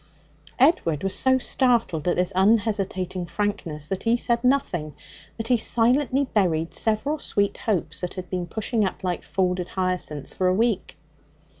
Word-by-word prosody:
Edward 215 - +3
was 195 - 0
so 260 0 +4
startled 235 - +1
at 175 - +2
this 180 +2 0
unhesitating 190 -3 +1
frankness 170 -4 -3
that 190 +2 -3
he 230 +1 +2
said 235 0 0
nothing. 185 - 0 0.4
But 225 +1 -5
he 245 - +5
silently 255 +5 +2
buried 165 -6 +1
several 270 +8 0
sweet 200 -6 0
hopes 160 -8 -1
that 180 - -4
had 185 -1 -6
been 180 -1 -3
pushing 220 +4 -1
up 190 0 -3
like 180 -2 -1
folded 180 -1 -1
hyacinths 180 -7 -3
for 185 - 0
a 185 - +3
week. 220 -2 0
195 Hz, 155 wpm, -24 LUFS, 180-230 Hz, 0.4 s, he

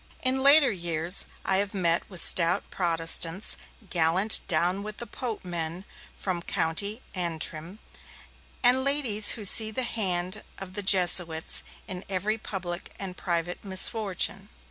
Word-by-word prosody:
In 260 0 +2
later 280 0 +5
years, 170 -1 +1 0.2
I 190 - +2
have 200 +1 -1
met 170 -3 -1
with 185 -3 +3
stout 175 +3 +3
Protestants, 165 +1 0 0.4
gallant 175 +5 +3
'Down 175 +3 -1
with 210 +1 -8
the 240 - -7
Pope' 230 -2 -8
men 170 +1 -5 0.3
from 180 -3 -5
County 200 +9 -3
Antrim, 170 0 -5 0.9
and 250 +2 +3
ladies 260 -7 +5
who 215 - -3
see 220 +3 +6
the 235 +4 -3
hand 185 -6 -2 0.2
of 190 -1 -11
the 205 - -4
Jesuits 175 -4 +3 0.3
in 185 -1 -7
every 205 +4 -3
public 180 -4 -7
and 190 -2 -6
private 175 -1 -5
misfortune. 195 0 0
190 Hz, 135 wpm, -24 LUFS, 175-210 Hz, 0.9 s, see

